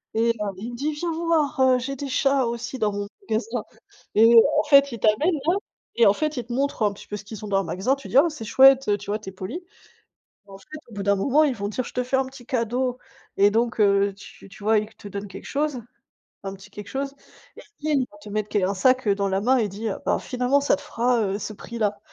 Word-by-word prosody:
et 230 Hz, +1 st, +2 dB
heu, -, -, -2 dB, 0.2 s
il 230 Hz, +5 st, -6 dB
me -, -, -7 dB
dit: 290 Hz, +5 st, -2 dB
«Viens 335 Hz, +3 st, -3 dB
voir, 325 Hz, -4 st, 0 dB
heu, 260 Hz, -1 st, +5 dB
j'ai 275 Hz, +2 st, -4 dB
des 280 Hz, +1 st, -5 dB
chats 275 Hz, -1 st, +2 dB
aussi 235 Hz, +2 st, -5 dB
dans 210 Hz, -1 st, +1 dB
mon 200 Hz, 0 st, -4 dB, 0.2 s
magasin». 225 Hz, +1 st, -1 dB, 0.5 s
Et 225 Hz, +2 st, +6 dB, 0.2 s
en 305 Hz, -, +4 dB
fait, 280 Hz, -2 st, +5 dB
il 230 Hz, -, -5 dB
t'amène 220 Hz, -, +3 dB, 0.2 s
là 350 Hz, -, +4 dB, 0.4 s
et 235 Hz, -, +5 dB
en -, -, +7 dB
fait, 305 Hz, +5 st, -2 dB
il 240 Hz, -, -3 dB
te 240 Hz, -, -10 dB
montre 275 Hz, -2 st, -1 dB
un 205 Hz, -, +3 dB
petit 200 Hz, -, -13 dB
peu 210 Hz, -, -5 dB
ce 210 Hz, -, -7 dB
qu'ils 215 Hz, 0 st, -9 dB
ont -, -, -6 dB
dans 195 Hz, -1 st, +2 dB
le 195 Hz, -, -2 dB
magasin, 190 Hz, -, 0 dB
tu 275 Hz, -, -11 dB
dis: 260 Hz, -, +2 dB
«Oh 315 Hz, +5 st, +7 dB
c'est 300 Hz, -7 st, -8 dB
chouette, 270 Hz, +2 st, +6 dB
heu». 205 Hz, -, +3 dB
Tu 205 Hz, 0 st, -11 dB
vois, 210 Hz, -, 0 dB
tu 205 Hz, -3 st, -8 dB
es -, -, -9 dB
polie. 195 Hz, -, -7 dB, 0.8 s
En 195 Hz, -1 st, -12 dB
fait, 195 Hz, -, -20 dB, 0.3 s
au -, -, -14 dB
bout 200 Hz, -, -4 dB
d'un 200 Hz, 0 st, +2 dB
moment, 280 Hz, +10 st, +3 dB
ils 275 Hz, -4 st, +1 dB
vont 200 Hz, 0 st, -3 dB
dire: 245 Hz, +4 st, -3 dB
«Je -, -, -9 dB
te 250 Hz, -, 0 dB
fais 265 Hz, +2 st, 0 dB
un 265 Hz, 0 st, +1 dB
petit 265 Hz, -1 st, -12 dB
cadeau». 250 Hz, 0 st, -1 dB, 0.4 s
Et 200 Hz, +1 st, +6 dB
donc 230 Hz, +1 st, 0 dB
heu, 200 Hz, -1 st, +3 dB
tu 200 Hz, 0 st, -14 dB
tu 200 Hz, -, -14 dB
vois, 220 Hz, +1 st, +3 dB
il 210 Hz, -, -2 dB
te 205 Hz, -, -11 dB
donne 200 Hz, +1 st, -6 dB
quelque -, -, -10 dB
chose, 285 Hz, -3 st, -1 dB, 0.6 s
un 195 Hz, -, -5 dB
petit 195 Hz, +1 st, -15 dB
quelque 205 Hz, -1 st, -9 dB
chose, 275 Hz, +1 st, -3 dB, 0.4 s
ils -, -, -11 dB, 0.2 s
viennent 295 Hz, -2 st, +1 dB
il 250 Hz, -, -3 dB
va 205 Hz, -, -16 dB
te 205 Hz, 0 st, -12 dB
mettre 210 Hz, 0 st, -2 dB
qu 205 Hz, -3 st, 0 dB
un 195 Hz, +2 st, +1 dB
sac 255 Hz, +4 st, +2 dB
dans 200 Hz, 0 st, +1 dB
la 190 Hz, +1 st, 0 dB
main 255 Hz, +4 st, +3 dB
et 220 Hz, -, +1 dB
dit, 205 Hz, +3 st, -5 dB
heu: 195 Hz, -, -3 dB
«Bah -, -, +3 dB
finalement 250 Hz, +3 st, 0 dB
ça 280 Hz, -, +3 dB
te 290 Hz, -, -12 dB
fera, 245 Hz, -4 st, 0 dB
heu, 200 Hz, -1 st, -1 dB
ce 215 Hz, -, -5 dB
prix-là». 215 Hz, -1 st, -3 dB
235 Hz, 270 wpm, -24 LUFS, 205-270 Hz, 0.8 s, en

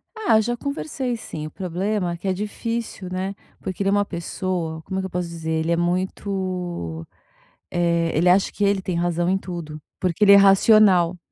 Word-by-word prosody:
Ah 420 Hz, -, +3 dB
já 240 Hz, +2 st, -2 dB
conversei, 280 Hz, -3 st, -3 dB
sim, 155 Hz, -8 st, -7 dB
o -, -, -8 dB
problema 185 Hz, +1 st, -2 dB
é -, -, -4 dB
que 195 Hz, -, -4 dB
é -, -, +3 dB
difícil, 210 Hz, 0 st, -4 dB
né. 190 Hz, +2 st, -3 dB, 0.3 s
Porque 190 Hz, +1 st, -4 dB
ele 195 Hz, -, +1 dB
é 195 Hz, -, +2 dB
uma 205 Hz, 0 st, +3 dB
pessoa, 170 Hz, -2 st, -4 dB
como 190 Hz, +3 st, -4 dB
é -, -, 0 dB
que 190 Hz, -, -3 dB
eu -, -, -8 dB
posso 180 Hz, 0 st, -2 dB
dizer, 165 Hz, -1 st, -4 dB
ele 160 Hz, +1 st, 0 dB
é -, -, +2 dB
muito, 180 Hz, -, -2 dB, 0.6 s
eh, 170 Hz, -1 st, +1 dB
ele 170 Hz, +3 st, +3 dB
acha 190 Hz, +2 st, +3 dB
que 205 Hz, -, -5 dB
ele 200 Hz, -1 st, +2 dB
tem 185 Hz, -, -3 dB
razão 175 Hz, 0 st, 0 dB
em 190 Hz, +1 st, +2 dB
tudo, 165 Hz, -5 st, -7 dB, 0.2 s
porque 180 Hz, +1 st, -1 dB
ele 200 Hz, -, +8 dB
é 200 Hz, -, +10 dB
racional, 195 Hz, -3 st, +5 dB
185 Hz, 200 wpm, -23 LUFS, 170-200 Hz, 0.6 s, é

